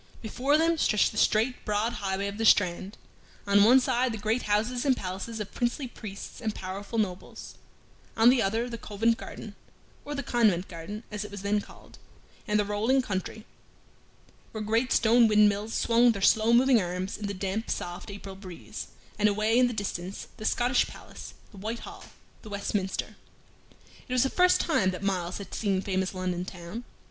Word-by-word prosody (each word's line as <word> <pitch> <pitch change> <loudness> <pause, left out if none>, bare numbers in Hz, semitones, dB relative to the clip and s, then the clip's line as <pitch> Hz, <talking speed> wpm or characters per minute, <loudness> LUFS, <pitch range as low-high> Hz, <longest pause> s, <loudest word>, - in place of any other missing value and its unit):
Before 265 +7 +1
them 330 0 +2
stretched 210 -6 +3
the 220 - -9
straight, 230 +4 +2
broad 210 +3 0
highway 195 0 -1
of 200 +1 -5
the - - 0
Strand, 190 -2 +3 0.5
on 200 0 +5
one 245 +5 +7
side 255 -1 +1
the 220 - -4
great 215 +4 0
houses 225 +4 +1
and 270 -3 +2
palaces 195 +4 -5
of 210 - -6
princely 240 +3 -1
priests 215 -1 -9
and 220 -3 -2
powerful 195 +4 -6
nobles; 190 -4 -3 0.6
on 225 +2 +7
the 255 -2 +3
other 225 +4 0
the 235 -2 -6
Covent 225 +3 0
Garden, - - -9 0.5
(or 290 0 -5
the 280 - -3
Convent 210 -8 +2
Garden, 185 +6 -7
as 210 0 -3
it 210 - -7
was 200 -1 -8
then 205 +1 +1
called), - - -16 0.5
and 210 -1 +2
the 210 - +1
rolling 225 +6 +1
country, 210 +1 -4 1.1
where 220 -1 -4
great 225 +4 +1
stone 230 +1 +5
windmills 210 0 +3
swung 235 0 +4
their 200 - -6
slow 220 +2 +4
moving 245 -1 +5
arms 180 +2 -3
in 210 - -5
the 200 - -3
damp, 195 +4 -3
soft 175 +3 -4
April 200 -1 -8
breeze, 190 -3 -9 0.3
and 210 0 +4
away 215 +3 +2
in 250 - +5
the - - -2
distance 195 -3 -5
the 215 - -7
Scottish 245 +3 +2
Palace, - - -11 0.2
the 205 - -14
White 220 +4 -4
Hall, - - -10 0.4
and 215 - -11
Westminster. 200 -1 -3 0.9
It 255 - -4
was 255 -1 +4
the 270 - 0
first 360 0 +4
time 200 - +2
that 185 +1 -5
Myles 185 -2 -1
had 200 -2 -9
seen 200 -3 0
famous 190 -1 -2
London 180 -1 -2
town. 185 +6 -8
210 Hz, 185 wpm, -28 LUFS, 195-235 Hz, 1.1 s, one